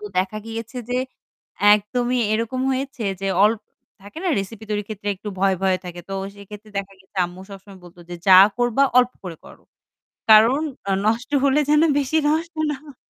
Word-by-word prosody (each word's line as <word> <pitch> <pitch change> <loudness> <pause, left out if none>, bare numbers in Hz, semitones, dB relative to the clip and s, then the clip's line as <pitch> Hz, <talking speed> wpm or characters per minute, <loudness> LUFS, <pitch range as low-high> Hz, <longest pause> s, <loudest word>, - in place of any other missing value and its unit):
তো 210 - -10
দেখা 190 +3 -1
গিয়েছে 225 +2 -7
যে 250 - 0 0.8
একদমই 245 +4 -1
এরকম 230 +3 -1
হয়েছে 265 -2 -4 0.2
যে, 195 - -3 0.2
অল্প 215 +1 +2 0.4
থাকে 200 +7 -11
না? - - +1
রেসিপি 200 +3 -6
তৈরির 210 -1 -2
ক্ষেত্রে 205 -1 -6
একটু 205 +3 -8
ভয়, 190 0 +2
ভয় 190 -1 +2
থাকে। 175 -1 -8
তো - - -6 0.2
সেক্ষেত্রে 210 +1 -12
দেখা 195 0 -6
গেছে 190 +1 -26
আম্মু 175 +1 -12
সবসময় 195 0 -12
বলতো 175 0 -15
যে - - -5
"যা 185 -1 +9 0.2
করবা, 245 +2 +2 0.2
অল্প 250 0 +3
করে 175 -3 -7
করো। - - -15 0.7
কারণ 225 +6 +6 0.3
আ - - +1
নষ্ট 230 +3 0
হলে 280 +1 +3
যেন 300 0 +5 0.2
বেশি 285 +3 0
নষ্ট 325 +2 -1 0.2
না - - -3
হয়।" 290 -3 -14
215 Hz, 185 wpm, -22 LUFS, 195-250 Hz, 0.8 s, যা